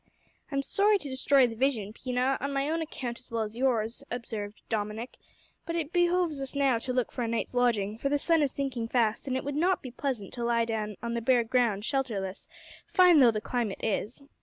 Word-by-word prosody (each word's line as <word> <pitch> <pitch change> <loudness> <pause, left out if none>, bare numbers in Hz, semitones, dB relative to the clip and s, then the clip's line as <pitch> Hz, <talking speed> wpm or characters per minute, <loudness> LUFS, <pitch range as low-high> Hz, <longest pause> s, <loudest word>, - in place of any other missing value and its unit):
"I'm 275 0 0
sorry 410 +8 +3
to 295 -7 -8
destroy 265 0 +4
the 235 - -3
vision, 225 -4 0
Pina, 255 +2 0
on 280 - -2
my 275 0 0
own 330 0 0
account 255 -7 -5
as 255 - -12
well 230 -2 -1
as 215 +1 -6
yours," 235 -3 0
observed 220 -3 -5
Dominick, 220 +2 -3 0.5
"but 335 - -4
it 325 -1 -3
behoves 350 -4 +2
us 270 +1 -5
now 270 -4 +3
to 255 - -4
look 250 -1 0
for 250 - -4
a 235 - 0
night's 230 +2 -2
lodging, 225 -4 +1
for 275 - 0
the 290 - +2
sun 325 +2 +2
is 285 -3 +1
sinking 260 -5 -3
fast, 230 0 +1
and 260 -1 0
it - - -4
would 285 - -3
not 360 +5 +1
be 255 - -7
pleasant 245 -6 -3
to 240 - -4
lie 235 -1 +2
down 215 -2 -3
on 235 0 -2
the 235 - -1
bare 245 +1 +3
ground 230 -4 +1
shelterless, 220 -9 -2 0.4
fine 360 -4 +6
though 250 -3 +7
the 215 -2 -1
climate 230 -4 -2
is. 225 +5 -2
250 Hz, 220 wpm, -29 LUFS, 225-280 Hz, 0.5 s, though